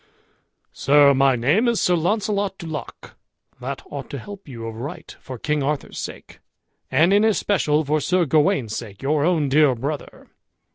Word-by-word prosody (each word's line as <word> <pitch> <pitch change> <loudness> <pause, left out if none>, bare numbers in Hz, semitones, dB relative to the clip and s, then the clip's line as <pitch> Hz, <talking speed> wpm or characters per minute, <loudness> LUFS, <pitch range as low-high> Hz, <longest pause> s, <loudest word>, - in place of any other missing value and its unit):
"Sir, 140 0 +5
my 135 -1 +3
name 150 - +2
is 235 -2 +1
Sir 180 - +2
Launcelot 200 +2 0
du 170 - -9
Lac, 155 -3 -7 0.5
that 130 +2 -5
ought 140 -2 -6
to 140 - -5
help 200 - -10
you 115 -4 -8
of 110 -1 -6
right 135 +6 -8
for 130 - -8
King 150 +4 -1
Arthur's 145 +1 -3
sake, - - -8 0.5
and 170 +5 +3
in 205 +1 +4
especial 185 -8 +1
for 150 +2 0
Sir 180 +1 +1
Gawain's 140 -6 +1
sake, 105 -1 -8
your 145 +1 +1
own 160 -3 +2
dear 140 -1 +4
brother. 140 +5 -6
150 Hz, 165 wpm, -22 LUFS, 135-180 Hz, 0.5 s, Sir